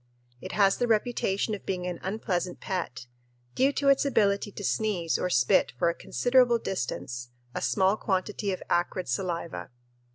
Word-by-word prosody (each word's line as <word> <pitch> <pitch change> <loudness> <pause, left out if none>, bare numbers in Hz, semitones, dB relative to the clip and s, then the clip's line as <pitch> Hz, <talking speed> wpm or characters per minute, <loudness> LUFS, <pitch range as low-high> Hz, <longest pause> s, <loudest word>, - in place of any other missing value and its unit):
It - - -7
has 195 0 +4
the 245 - +1
reputation 215 -2 +1
of 210 - -5
being 180 -2 -3
an 180 -2 -4
unpleasant 185 -3 -2
pet, 175 -10 -4 0.5
due 270 +2 +3
to 280 - 0
its 275 - +5
ability 205 -7 +2
to 205 - -8
sneeze 190 -5 0
or 180 - 0
spit 125 -4 +3
for 170 - +3
a - - -7
considerable 245 +4 +3
distance 125 - -4 0.2
a - - -3
small 195 +1 +2
quantity 200 +1 -1
of 185 - -4
acrid 175 +1 0
saliva. 170 +6 -3
195 Hz, 160 wpm, -28 LUFS, 175-215 Hz, 0.5 s, its